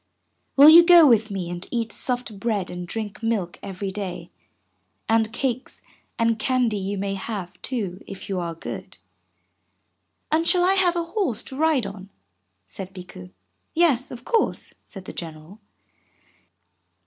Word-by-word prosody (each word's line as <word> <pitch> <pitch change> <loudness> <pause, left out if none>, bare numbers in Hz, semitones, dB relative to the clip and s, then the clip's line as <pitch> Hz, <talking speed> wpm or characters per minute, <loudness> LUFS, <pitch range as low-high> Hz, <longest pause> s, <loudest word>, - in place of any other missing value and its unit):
Will 280 +2 +9
you 335 +2 +10
go 345 -2 +8
with 225 -5 +4
me 190 -3 -4
and 175 +1 -6
eat 230 -2 -2
soft 245 -3 -3
bread 205 -4 -1
and 180 0 -6
drink 215 +2 -5
milk 215 -6 -2
every 195 0 -5
day, 195 -2 -6 0.8
and 225 -1 +2
cakes 255 +1 -3 0.3
and 230 -1 +1
candy 250 -4 +1
you 195 +1 -3
may 195 0 -2
have, 190 -3 -6
too, 205 -7 -3
if 195 - -9
you 190 -2 -2
are 170 -1 -4
good?" 165 - -7 1.3
"And 325 +2 +2
shall 355 -1 +4
I 380 - +4
have 365 -2 +3
a 340 - 0
horse 335 - -2
to 265 - -9
ride 300 -5 +2
on?" 195 -1 -8 0.6
said 190 0 -8
Bikku, 180 - -10 0.5
"Yes, 305 -7 +3
of 245 0 -10
course," 460 - 0
said 195 -3 -10
the - - -8
General. 160 +4 -8
220 Hz, 150 wpm, -24 LUFS, 190-265 Hz, 1.3 s, you